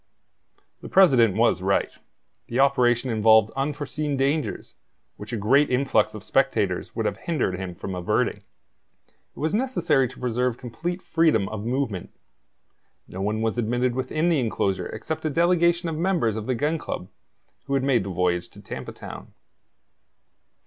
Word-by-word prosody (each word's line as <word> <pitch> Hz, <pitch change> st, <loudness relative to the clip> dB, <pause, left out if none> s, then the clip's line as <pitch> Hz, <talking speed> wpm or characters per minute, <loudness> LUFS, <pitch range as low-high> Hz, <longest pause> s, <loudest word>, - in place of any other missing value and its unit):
The -, -, -8 dB
president 130 Hz, -, +5 dB
was 115 Hz, -4 st, +3 dB
right. 95 Hz, +1 st, +1 dB, 0.6 s
The 120 Hz, -, -2 dB
operation 125 Hz, -2 st, +3 dB
involved 110 Hz, 0 st, +5 dB
unforeseen 145 Hz, +1 st, -2 dB
dangers, 140 Hz, +3 st, -1 dB, 0.4 s
which 105 Hz, +2 st, -9 dB
a 115 Hz, -, -2 dB
great 135 Hz, +8 st, +3 dB
influx 125 Hz, -5 st, +1 dB
of 105 Hz, -, -8 dB
spectators 110 Hz, -9 st, 0 dB
would 115 Hz, -, -1 dB
have 100 Hz, -1 st, -1 dB
hindered 120 Hz, -, -2 dB
him 90 Hz, -2 st, -5 dB
from 95 Hz, -, -6 dB
averting. 90 Hz, -1 st, 0 dB
It -, -, -26 dB
was 155 Hz, +2 st, -1 dB
necessary 175 Hz, -, +1 dB
to 125 Hz, -, -13 dB
preserve 125 Hz, 0 st, -1 dB
complete 165 Hz, +10 st, -5 dB
freedom 165 Hz, -, +2 dB
of 110 Hz, 0 st, -5 dB
movement. 120 Hz, -8 st, -2 dB, 1.0 s
No 95 Hz, -, -7 dB
one 105 Hz, +2 st, -1 dB
was 115 Hz, +2 st, -1 dB
admitted 120 Hz, +2 st, 0 dB
within 135 Hz, +6 st, 0 dB
the 165 Hz, -4 st, +2 dB
enclosure 95 Hz, -6 st, -1 dB
except 150 Hz, +8 st, -5 dB
a -, -, +2 dB
delegation 170 Hz, +2 st, +2 dB
of 165 Hz, -, -2 dB
members 170 Hz, -, +1 dB
of 110 Hz, -1 st, -5 dB
the 130 Hz, -, 0 dB
Gun 150 Hz, +6 st, 0 dB
Club, 90 Hz, -, -5 dB, 0.6 s
who 140 Hz, -, -1 dB
had 135 Hz, -, +1 dB
made 130 Hz, -6 st, +2 dB
the 95 Hz, -, -5 dB
voyage 90 Hz, -1 st, 0 dB
to -, -, -16 dB
Tampa -, -, -7 dB
Town. -, -, -10 dB
125 Hz, 155 wpm, -24 LUFS, 110-150 Hz, 1.0 s, president